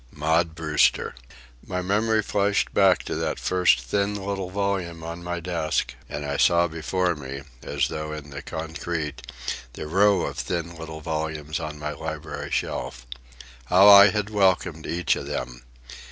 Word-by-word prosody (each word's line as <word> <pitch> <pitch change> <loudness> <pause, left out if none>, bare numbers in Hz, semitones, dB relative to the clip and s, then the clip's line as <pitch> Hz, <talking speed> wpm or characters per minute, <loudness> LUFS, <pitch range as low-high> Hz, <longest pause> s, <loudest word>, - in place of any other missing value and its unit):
Maud 80 +2 +1
Brewster! 75 -3 +2 0.5
My 90 0 -3
memory 110 +3 +2
flashed 100 0 +1
back 95 -3 +4
to - - -4
that - - -1
first 90 -7 +3
thin 100 +12 -1
little 95 -2 -3
volume 95 -4 -2
on 85 +1 -6
my 85 0 -3
desk, 85 -2 -1 0.2
and 75 0 -4
I 70 0 -2
saw 85 0 +4
before 90 +2 -1
me, 70 -1 -7 0.2
as - - 0
though 75 0 -5
in 75 -2 -7
the 70 - -6
concrete, 80 -1 -4 0.5
the - - -6
row 95 +5 +4
of - - -3
thin 85 -1 -3
little 80 -1 -8
volumes 80 0 -3
on 75 -2 -5
my 75 0 -4
library 80 -1 -6
shelf. 60 0 -3 0.6
How 95 +7 +7
I 100 0 +10
had 105 +2 -2
welcomed 95 -5 +1
each 85 -1 +1
of - - -6
them! - - -4
85 Hz, 155 wpm, -25 LUFS, 75-95 Hz, 0.6 s, I